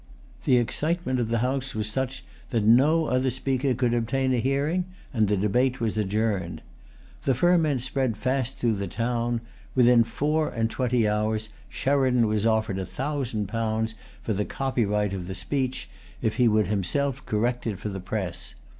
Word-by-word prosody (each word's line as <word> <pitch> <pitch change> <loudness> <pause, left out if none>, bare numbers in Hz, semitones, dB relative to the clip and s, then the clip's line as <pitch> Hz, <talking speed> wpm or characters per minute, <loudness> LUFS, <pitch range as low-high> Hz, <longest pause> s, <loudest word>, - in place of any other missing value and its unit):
The 125 - +5
excitement 130 +2 0
of 120 - 0
the 115 +1 0
House 135 0 -2
was 110 -1 -1
such 130 +3 -3 0.2
that 115 -4 0
no 140 +9 +5
other 130 -1 +1
speaker 130 +1 0
could 120 0 +1
obtain 130 +3 +1
a 125 - +2
hearing; 140 +8 0 0.3
and 110 -4 +2
the 105 0 +1
debate 125 +7 +1
was 115 -3 -1
adjourned. 105 -4 -1 0.6
The 135 - +1
ferment 155 -3 +3
spread 130 -4 -1
fast 130 +2 -1
through 115 -3 +1
the 100 0 -3
town. 120 +2 -1 0.3
Within 125 -2 +6
four 150 +6 0
and 115 -1 -1
twenty 125 -3 +1
hours, 110 +1 0 0.2
Sheridan 130 -4 +2
was 105 0 +1
offered 110 -3 +1
a 95 - -3
thousand 130 -1 -2
pounds 110 +1 -1 0.3
for 110 - -1
the 105 +1 0
copyright 105 -6 0
of 90 -2 -4
the 95 - -5
speech, 130 -2 -2 0.3
if 110 - -1
he 125 -2 +5
would 110 -1 +3
himself 135 +7 -1
correct 120 +3 0
it 105 -4 -2
for 105 - -4
the 95 -1 -5
press. 90 -2 -4
120 Hz, 170 wpm, -26 LUFS, 110-130 Hz, 0.6 s, Within